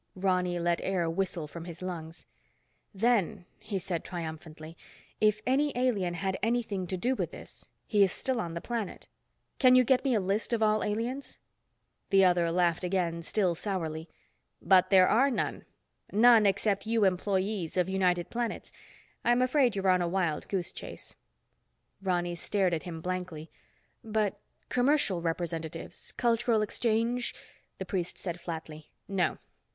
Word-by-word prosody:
Ronny 180 -2 +1
let 170 0 0
air 185 -3 0
whistle 170 -2 -2
from 165 +3 -8
his 170 -1 -8
lungs. 165 -3 -6 0.7
"Then," 210 -4 +1
he 205 - -4
said 175 -2 -3
triumphantly, 160 -1 -7 0.4
"if 215 0 +3
any 285 +3 +2
alien 205 -9 +1
had 190 +1 -2
anything 225 -5 -1
to 185 - -3
do 245 +8 +1
with - - -2
this, - - -10 0.2
he 210 -2 +2
is 195 -2 +5
still 260 -3 -2
on 170 -3 -5
the 170 - -4
planet. 230 -4 -4 0.5
Can 255 -2 +7
you 255 - +7
get 255 +1 +3
me 265 -4 +2
a - - +3
list 200 +5 -1
of 225 -1 +2
all 215 0 +3
aliens?" 235 +6 -3 0.7
The 195 -1 +6
other 175 -2 +3
laughed 175 0 +1
again, 175 -2 0
still 185 +1 +1
sourly. 165 -4 -4 0.5
"But 185 +1 +4
there 185 -2 +6
are 265 +5 +4
none. 255 - -2 0.5
None 225 0 +6
except 200 +1 0
you 225 -1 +2
employees 190 -1 0
of 180 -1 +2
United 180 -2 +1
Planets. 235 -2 -3 0.5
I'm 240 +1 +3
afraid 255 -3 +3
you're 195 -1 -1
on 185 -1 +4
a 175 - +1
wild 170 -4 -1
goose 185 -3 -2
chase." - - -8 0.9
Ronny 175 -2 0
stared 185 +1 0
at 160 - -2
him 165 -1 -6
blankly. 180 -3 -4 0.5
"But 215 -3 -1 0.3
commercial 250 - +2
representatives, 165 0 -4
cultural 235 -2 +2
exchange—" 230 +3 0 0.4
The - - -5
priest 180 -4 -3
said 175 -2 -5
flatly, 160 -2 -7 0.2
"No. 195 -2 0
190 Hz, 150 wpm, -29 LUFS, 175-220 Hz, 0.9 s, Can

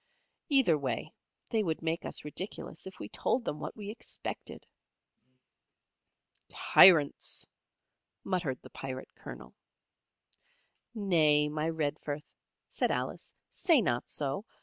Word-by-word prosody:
Either 260 - +5
way, 130 -4 -3 0.4
they 225 - +2
would 165 -5 -2
make 165 +1 -1
us - - -4
ridiculous 185 +5 -5
if 190 - -10
we - - -6
told 240 - 0
them 150 - -3
what - - -5
we 205 -1 -5
expected." 230 - -7 1.8
"Tyrants!" 160 -6 +5 0.8
muttered 175 -9 -1
the - - -12
Pirate 130 -1 -7
Colonel. 60 +1 -10 1.4
"Nay, 155 -8 +4
my 155 +1 -1
Redforth," 150 -2 -2 0.4
said - - 0
Alice, - - -3 0.2
"say 340 -5 +4
not 120 - 0
so. 145 +6 -2
155 Hz, 110 wpm, -31 LUFS, 145-195 Hz, 1.8 s, Either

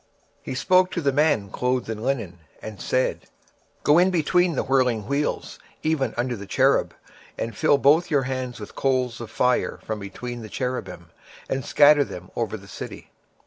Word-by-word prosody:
26:010:002 - - -40
And - - -39
he - - -3
spake 185 +7 +3
unto 185 -1 0
the 140 -2 +2
man 145 -9 +2
clothed 125 0 -1
with 110 -1 -4
linen, 110 -8 -2 0.2
and 105 -4 -9
said, 130 0 -1 0.6
Go 150 +3 +5
in 180 +1 +5
between 175 0 +2
the - - 0
wheels, 130 +1 0 0.2
even 155 -4 0
under 120 +1 -1
the 100 -2 -9
cherub, - - +2 0.4
and 115 -2 -4
fill 145 - +3
thine 145 0 +3
hand 130 -2 -4
with 105 - -9
coals 130 -3 0
of 115 - -7
fire 125 0 +1
from 110 -1 -4
between 120 +5 -7
the 110 - -9
cherubims, 125 - -4 0.4
and 135 0 -2
scatter 145 +2 +6
them 90 -8 -9
over - - -2
the - - -15
city. - - -9
130 Hz, 175 wpm, -24 LUFS, 115-145 Hz, 0.6 s, scatter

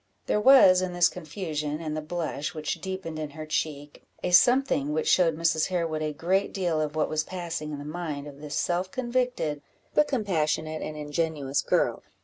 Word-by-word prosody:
There 210 - +1
was, 210 -8 +7
in 185 -1 -2
this 175 0 +5
confusion, 155 -3 -4
and 155 -2 -4
the 155 - -2
blush 155 -2 -4
which 155 -1 -3
deepened 190 -4 -5
in 155 -1 -4
her 155 - -5
cheek, 145 -2 -3 0.2
a 180 - -1
something 240 - +4
which 155 - -1
showed 170 -4 +4
Mrs. 160 -1 +2
Harewood 165 -4 -1
a 155 -1 -1
great 180 +6 0
deal 175 -5 0
of 150 0 -3
what 155 - +1
was 155 0 0
passing 170 -4 -5
in 145 - -4
the 145 - -8
mind 150 -3 -4
of 145 -1 -11
this 150 -1 -5
self 180 +1 0
convicted, 240 - -1 0.3
but 300 - +4
compassionate 160 - -1
and 155 - -5
ingenuous 150 -2 -1
girl. - - +1
160 Hz, 185 wpm, -27 LUFS, 150-180 Hz, 0.3 s, was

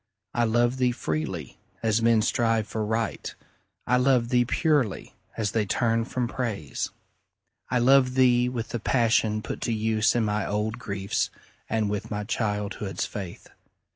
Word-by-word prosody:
I 120 -1 +2
love 120 +3 +2
thee 125 -1 +2
freely, 80 -9 -4 0.2
as 110 0 +2
men 115 -1 +4
strive 115 -3 +1
for 110 0 -3
Right; 110 +2 -2 0.5
I 125 - +3
love 125 -2 +3
thee 120 -1 +3
purely, 145 - 0 0.2
as 110 -3 0
they 110 -3 0
turn 115 +2 +1
from 125 0 -2
Praise. 110 - -3 0.8
I 125 - +1
love 130 +1 +4
thee 125 -1 +4
with 120 -3 -4
the 120 - -3
passion 110 -2 +2
put - - -5
to - - -1
use 110 0 +2
In 115 -2 +2
my 105 -1 0
old 105 +3 -2
griefs, 100 -4 -2 0.4
and 110 -1 +1
with 100 0 -3
my 105 0 -3
childhood's 105 -2 -2
faith. 95 -4 -7
115 Hz, 155 wpm, -26 LUFS, 105-120 Hz, 0.8 s, men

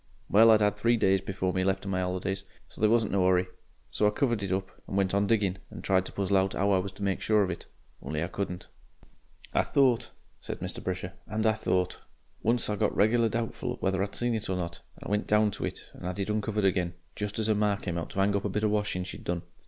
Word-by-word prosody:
Well, 110 +3 +7
I 110 - +8
'ad 105 -1 +2
three 115 +3 +3
days 95 -3 +3
before 95 -1 -2
me 95 - +1
left 95 +1 0
of 100 - -3
my 95 -1 0
'olidays, 95 +1 -2 0.2
so - - -12
there 110 - +5
wasn't 115 -2 +3
no 95 -2 +3
hurry, 90 0 +4 0.5
so 105 - +2
I - - +5
covered 120 0 0
it 100 -2 -3
up 95 0 -1 0.2
and 95 - -3
went 95 -1 +1
on 100 0 +2
digging, 100 -4 +1
and - - -9
tried 95 -1 +2
to - - -8
puzzle 100 0 +1
out 95 0 +1
'ow 100 +1 +2
I 95 - +4
was 95 +1 -3
to 100 - -8
make 95 -1 0
sure 105 -1 +3
of 95 - -1
it. 85 - -7 0.3
Only 75 +3 -2
I - - -1
couldn't. 90 -1 -4 0.9
"I - - +4
thought," 125 -4 +2 0.3
said - - -6
Mr. - - -5
Brisher, 90 0 -3
"AND 110 +2 -1
I 110 - +5
thought. 90 -4 -1 0.4
Once 115 +1 +1
I 105 - 0
got 105 -1 +1
regular 115 +2 +4
doubtful 115 +1 -3
whether 95 0 0
I'd 100 0 -2
seen 120 0 0
it 110 -3 -3
or 95 - 0
not, 85 -1 -4 0.2
and - - -8
went 105 0 0
down 105 0 +4
to 100 - -3
it - - -7
and - - -7
'ad 90 - -4
it 100 +1 -1
uncovered 105 -1 0
again, 90 -2 +1 0.2
just 105 0 -4
as 110 - 0
her 110 - +3
ma 105 -1 +2
came 90 -3 -3
out 80 - -5
to 95 - -1
'ang 100 +1 +2
up 100 - 0
a - - 0
bit 105 +3 -1
of 105 - +3
washin' 100 -3 0
she'd - - -8
done. 85 -1 -2
100 Hz, 260 wpm, -29 LUFS, 95-105 Hz, 0.9 s, I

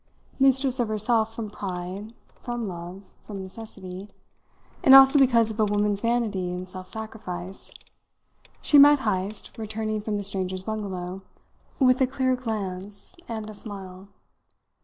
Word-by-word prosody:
Mistress 265 -1 +3
of 240 - +1
herself 220 +1 +1
from 220 -3 -5
pride, 190 +3 -6 0.3
from 240 -2 -4
love, 175 +2 -7 0.2
from 205 -2 -7
necessity, 190 -1 -9 0.7
and 265 - +9
also 270 +1 +9
because 235 -4 +4
of 220 - -9
a 215 - +4
woman's 205 0 0
vanity 225 -6 0
in 180 +1 -4
self 185 0 -9
sacrifice, 195 -4 -7 0.9
she 290 - +6
met 290 0 +8
Heyst, 205 -1 -3
returning 215 0 -3
from 210 0 -2
the 205 - -3
strangers' 190 -1 -3
bungalow, 190 -3 -4 0.6
with 255 -1 +4
a 260 - +5
clear 260 -1 +1
glance 200 - -5 0.2
and 220 -2 -4
a 215 - -8
smile. 195 -2 -8
210 Hz, 135 wpm, -25 LUFS, 190-230 Hz, 0.9 s, and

